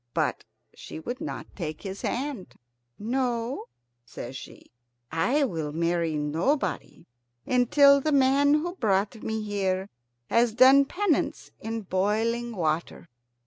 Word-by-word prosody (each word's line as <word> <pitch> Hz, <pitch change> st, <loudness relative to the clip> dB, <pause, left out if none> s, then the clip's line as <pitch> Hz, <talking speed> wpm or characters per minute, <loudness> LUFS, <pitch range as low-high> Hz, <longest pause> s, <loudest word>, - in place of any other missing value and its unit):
But -, -, -1 dB, 0.3 s
she -, -, -9 dB
would 245 Hz, -, -6 dB
not 315 Hz, -, -5 dB
take 155 Hz, -5 st, -5 dB
his 195 Hz, -1 st, -6 dB
hand. 260 Hz, -6 st, -4 dB, 0.4 s
"No," 240 Hz, +2 st, -2 dB, 0.4 s
says 120 Hz, +2 st, -8 dB
she; -, -, -11 dB, 0.4 s
"I 245 Hz, -, +2 dB
will 160 Hz, -, -2 dB
marry 170 Hz, 0 st, 0 dB
nobody 165 Hz, -, -1 dB, 0.4 s
until 280 Hz, +3 st, +5 dB
the 310 Hz, -, 0 dB
man 280 Hz, +1 st, +4 dB
who 340 Hz, +3 st, -1 dB
brought 210 Hz, -, 0 dB
me 220 Hz, -1 st, -3 dB
here 195 Hz, -2 st, -1 dB, 0.4 s
has 235 Hz, -1 st, +2 dB
done 265 Hz, +3 st, +7 dB
penance 365 Hz, +2 st, -1 dB
in 225 Hz, 0 st, -4 dB
boiling 220 Hz, +5 st, -1 dB
water." 165 Hz, -1 st, -2 dB
225 Hz, 120 wpm, -26 LUFS, 180-270 Hz, 0.4 s, done